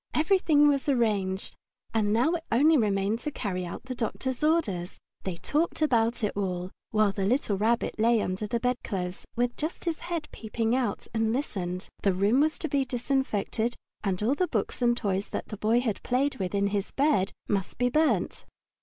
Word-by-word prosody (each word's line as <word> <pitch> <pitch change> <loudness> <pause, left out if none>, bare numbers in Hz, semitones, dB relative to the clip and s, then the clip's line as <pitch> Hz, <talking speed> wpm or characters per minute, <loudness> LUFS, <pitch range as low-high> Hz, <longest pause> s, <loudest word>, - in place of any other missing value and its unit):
Everything 310 -3 +4
was 285 0 +2
arranged, 205 -7 0 0.4
and 215 -2 +2
now 240 +8 +3
it 340 -2 -2
only 295 +8 +5
remained 205 -3 +1
to 300 - -3
carry 185 -9 -3
out - - -7
the 260 0 -5
doctor's 255 +3 -3
orders. 215 - +1 0.3
They 190 -2 -2
talked 305 - 0
about 235 -6 +2
it 210 - 0
all, 185 -2 -2 0.2
while 215 -2 +3
the 195 0 -3
little 215 0 +1
Rabbit 220 +3 0
lay 230 +1 +4
under 195 +1 -2
the 235 +3 -1
bedclothes, 200 -7 -2
with 240 0 0
just 310 +4 -4
his 335 -2 -1
head 335 -3 -4
peeping 225 +1 -1
out, 245 -6 -1
and 225 -1 +1
listened. 185 -8 -3
The 195 - +3
room 205 +7 +3
was 310 +2 +2
to 320 - -3
be 280 -2 +1
disinfected, 245 -3 -1 0.3
and 195 -1 -1
all 240 +5 +3
the 360 +5 +1
books - - -2
and 240 -1 +3
toys 200 -3 -1
that - - -4
the 210 - -6
Boy 225 +4 +2
had 225 -5 -2
played 270 +3 0
with 190 0 -2
in 200 0 +2 0.3
bed 275 -9 +2 0.2
must 195 -3 -1
be 245 0 +2
burnt. 310 +3 +1
230 Hz, 185 wpm, -28 LUFS, 200-275 Hz, 0.4 s, only